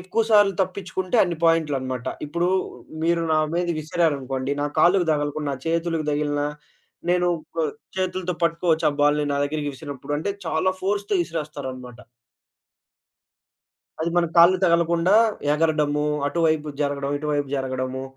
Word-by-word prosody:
ఎక్కువసార్లు 205 +1 +3
తప్పించుకుంటే, 185 +2 -3
అన్ని 175 -2 -1
పాయింట్లనమాట. 140 -7 +1 0.2
ఇప్పుడూ, 170 +4 0 0.6
మీరు 170 0 +2
నా 155 - +4 0.2
మీద 175 0 0
విసిరారనుకోండి, 140 -4 -1
నా - - +1
కాళ్ళుకు 175 0 +4
దగలకున్న, 145 0 -2
నా 135 - -3
చేతులకు 165 -1 -1
దగిలినా, 145 0 0 0.6
నేను 180 0 +2 0.3
ప - - -22 0.4
చేతులతో 185 -1 -2
పట్టుకోవచ్చు, 165 -1 +1
ఆ - - -5
బాలుని 145 0 +3
నా 140 - 0
దగ్గరికి 145 0 -2
విసిరినప్పుడు. 140 +1 -6
అంటే, 200 +6 -2
చాలా 160 +4 +1
ఫోర్స్‌తో 205 +1 -1
ఇసిరేస్తారనమాట. 135 -7 -6 2.0
అది 165 +1 0
మన 175 -1 +3
కాళ్ళు 175 +2 +7
తగలకుండా 170 +2 +3 0.4
ఎగరడము, 150 -1 +1 0.2
అటువైపు 155 0 +1
జరగడం, 140 -1 -1
ఇటువైపు 145 -2 -1
జరగడము, 130 0 -3
155 Hz, 120 wpm, -23 LUFS, 145-175 Hz, 2.0 s, కాళ్ళు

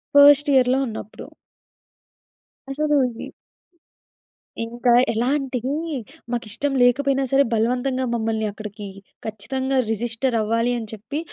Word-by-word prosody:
First 290 +1 +7
ఇయర్‌లో 255 0 +4
ఉన్నప్పుడు. 215 -1 -8 1.4
అసలు 295 +1 0 0.3
ఈ - - -6 1.4
ఇంకా 240 +1 +1 0.2
ఎలాంటివి 260 +2 -1 0.6
మాకిష్టం 240 +4 -2
లేకపోయినా 270 +2 +2
సరే 275 +1 +5
బలవంతంగా 250 +3 0
మమ్మల్ని 220 -1 -1
అక్కడికి 210 -1 -8 0.4
ఖచ్చితంగా 260 +5 -2
రిజిస్టర్ 230 +2 -1
అవ్వాలి 230 +3 +1
అని 220 - -7
చెప్పి 220 +8 -5
245 Hz, 95 wpm, -22 LUFS, 225-270 Hz, 1.4 s, First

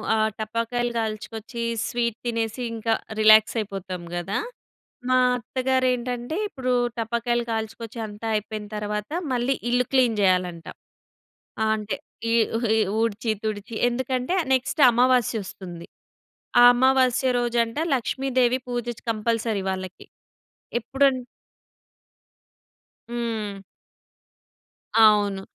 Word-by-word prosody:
ఆహ్, 220 0 +2
టపాకాయలు 230 +2 -1
కాల్చుకొచ్చి, 225 +1 -4 0.2
స్వీట్ 235 -2 -1
తినేసి 230 0 -2
ఇంకా 225 0 0 0.3
రిలాక్స్ 215 +1 +6
అయిపోతాం 190 -4 -5
గదా! 175 +3 -2 0.7
మా 255 - +4 0.2
అత్తగారేంటంటే 250 +1 -1
ఇప్పుడు 260 -9 -3 0.3
టపాకాయలు 235 +1 0
కాల్చుకొచ్చి 225 +1 -5
అంతా 210 +2 -7
అయిపోయిన 215 0 -4
తరువాత 210 +2 -3 0.2
మళ్ళీ 250 +2 +1 0.2
ఇల్లు 245 +1 +2
క్లీన్ 250 -5 +3
జేయాలంట. 180 -3 +1 1.0
ఆ! - - +2
అంటే 210 -2 -3 0.4
ఈ, - - +3 0.4
ఈ - - +3 0.2
ఊడ్చి, 225 0 0
తుడిచి. 215 +1 -4
ఎందుకంటే 255 +5 -1 0.2
నెక్స్ట్ 260 +3 0
అమావాస్య 245 -2 +2
ఒస్తుంది. 175 -3 -9 0.7
ఆ - - +8
అమావాస్య 260 0 +3
రోజంట 235 0 0 0.2
లక్ష్మీదేవి 255 0 +1
పూజ 240 -1 -3 0.2
కంపల్సరీ 225 -1 -1
వాళ్ళకి. 185 -1 -6 0.7
ఎప్పుడం 270 +3 +2 2.0
హ్మ్. 225 -4 -3 1.4
అవును. 205 -3 +5
230 Hz, 95 wpm, -24 LUFS, 215-245 Hz, 2.0 s, ఆ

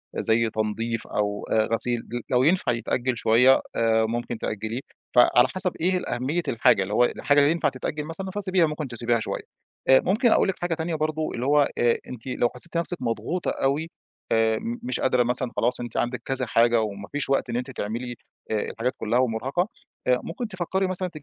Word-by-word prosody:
زي 115 0 +2
تنضيف 110 +1 -2
أو 105 0 -2
آآ 110 0 +3
غسيل 120 +1 0 0.3
لو 125 0 +3
ينفع 165 -3 +3
يتأجِّل 120 +1 -1
شوية 125 +5 +5
آآ، 115 -1 +3
ممكن 120 +1 -3
تأجّليه. 110 +3 -3 0.4
فعلى 120 +1 +6
حسَب 185 -1 +1
إيه 185 +1 +2 0.2
أهمية 135 +8 -1
الحاجة، 115 -3 +3
اللي 100 - -5
هو 120 - +4
الحاجة 145 +3 +2
اللي 145 +1 +5
ينفَع 165 -3 +1
تتأجِّل 150 +3 -4
مثلًا 190 +4 -5
فسيبيها، 185 -3 +1
ممكن 150 -2 -3
تسيبيها 120 -1 0
شوية. - - -4 0.5
آآ، 130 - +8
ممكن 220 +5 +2
أقول - - +4
لِك 190 - -1
حاجة 175 -1 0
تانية 160 0 -2
برضه، 155 0 -1
اللي 120 +2 -3
هو 145 0 +4
آآ 120 -1 +3
أنتِ 125 0 -9
لو 120 -2 +1
حسّيتِ 165 +7 -3
نفسِك 170 +1 -1
مضغوطة 125 +9 -2
أوي 145 +4 -1 0.4
آآ، 110 -1 +3
م 235 +1 -4
مش 255 - -2
قادرة 125 -2 +3
مثلًا 125 +1 -1
خلاص، 125 - +1
أنتِ 120 -2 -5
عندِك 120 +1 -1
كذا 130 -1 -1
حاجة 115 0 +4
وما 100 -2 -5
فيش 145 -1 -2
وقت 135 -2 +1
إن 120 - -1
أنتِ 125 +2 -4
تعملي 120 +2 -4 0.4
آآ - - +1 0.2
الحاجات 125 +3 -2
كلّها 115 +3 +1
ومُرهَقة، 130 - 0 0.4
آآ 125 0 +4
ممكن 220 +8 -5
تفكّري 190 0 -1
مثلًا 185 0 -1
125 Hz, 190 wpm, -25 LUFS, 115-160 Hz, 0.5 s, آآ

